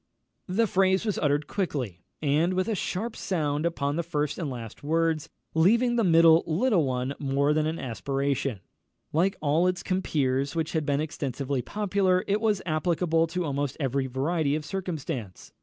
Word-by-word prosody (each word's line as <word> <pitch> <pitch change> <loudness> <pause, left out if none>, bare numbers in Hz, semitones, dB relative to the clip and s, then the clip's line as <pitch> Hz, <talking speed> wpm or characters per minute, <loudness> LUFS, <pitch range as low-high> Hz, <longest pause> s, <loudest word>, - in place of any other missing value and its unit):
The 205 +5 +2
phrase 190 0 +2
was 210 -4 -1
uttered 145 0 +1
quickly, 135 - -3 0.2
and 155 +5 +2
with 185 0 0
a 225 - 0
sharp 215 +4 -3
sound 155 -4 -1
upon 145 -3 -2
the - - +1
first 150 -2 -2
and 160 -5 -2
last 115 -4 -7
words, 160 0 0 0.2
leaving 230 +9 +4
the 235 - +2
middle 165 -2 +6
one 160 +2 0
little 140 - +1 0.2
more 140 +2 +3
than 155 0 +1
an 160 +1 -2
aspiration. 135 - -2 0.5
Like 185 +5 +2
all 155 +4 +2
its 180 -1 -1
compeers 140 -7 0
which 160 -1 -1
had 155 -3 -1
been 145 0 +1
extensively 140 -3 -3
popular, 195 0 +1
it 205 +2 +1
was 210 -4 +1
applicable 165 0 +1
to 175 +2 -2
almost 140 -2 -2
every 135 -1 0
variety 140 +3 0
of 155 -1 -4
circumstance. 145 - -5
160 Hz, 165 wpm, -27 LUFS, 140-185 Hz, 0.5 s, middle